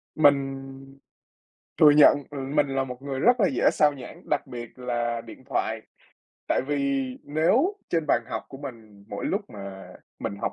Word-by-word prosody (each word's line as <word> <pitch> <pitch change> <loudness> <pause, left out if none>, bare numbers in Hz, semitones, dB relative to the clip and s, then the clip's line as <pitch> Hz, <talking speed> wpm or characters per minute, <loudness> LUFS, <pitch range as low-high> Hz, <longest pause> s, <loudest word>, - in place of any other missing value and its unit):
Mình 135 -2 +3 1.2
thừa 150 - +9
nhận, 145 0 +7
ừ, 145 - -6 0.2
mình 140 - +3
là 135 0 0
một 125 0 -8
người 135 -1 -4
rất 245 0 +4
là 195 - +5
dễ 130 - +3
sao 150 -1 +4
nhãng, 130 -3 -10
đặc 145 -1 0
biệt 120 -1 -9
là 120 -2 -2
điện 115 +3 -12
thoại. 110 -3 -1 0.7
Tại - - +2
vì 140 -1 0 0.2
nếu 225 - +2
trên 165 -2 +1
bàn 120 - +2
học 130 - -4
của 135 - -10
mình 110 -7 -10
mỗi - - -5
lúc - - 0
mà 100 -1 -9 0.3
mình 100 - -3
học - - -1
135 Hz, 175 wpm, -26 LUFS, 120-145 Hz, 1.2 s, thừa